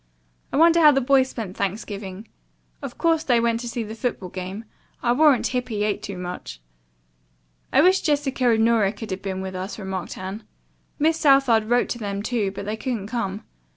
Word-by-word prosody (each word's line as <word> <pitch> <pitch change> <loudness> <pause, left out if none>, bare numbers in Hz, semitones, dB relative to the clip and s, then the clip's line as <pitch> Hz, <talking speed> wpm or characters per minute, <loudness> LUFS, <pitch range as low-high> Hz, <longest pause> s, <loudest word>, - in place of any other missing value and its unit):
I - - -1
wonder 335 +2 +6
how 310 -2 +8
the 275 -2 +4
boys 265 0 +3
spent 210 -7 -6
Thanksgiving. 200 0 -4 0.5
Of - - -7
course 325 -1 +2
they 245 -3 +3
went 230 0 +1
to 235 -1 -4
the 215 - -7
football 225 -5 -3
game. 185 +4 -6 0.4
I'll 240 0 +2
warrant 295 -3 +4
Hippy 245 -4 -2
ate 210 -1 -1
too 200 -2 -6
much." 180 - -7 1.1
"I - - +5
wish 375 +2 +4
Jessica 280 -4 +1
and 225 -1 +3
Nora 220 -4 +3
could 215 0 -8
have 190 - -4
been 190 -1 -4
with 190 0 -5
us," 185 +2 -5
remarked 190 -3 -5
Anne. 190 +4 -6 0.5
"Miss 315 +2 +2
Southard 270 -7 +4
wrote 240 +2 +1
them, 205 -4 -4
too, 220 -4 0
but 200 +1 -7
they 215 +2 -3
couldn't 220 -3 -4
come. 215 -3 -3
225 Hz, 185 wpm, -23 LUFS, 195-255 Hz, 1.1 s, how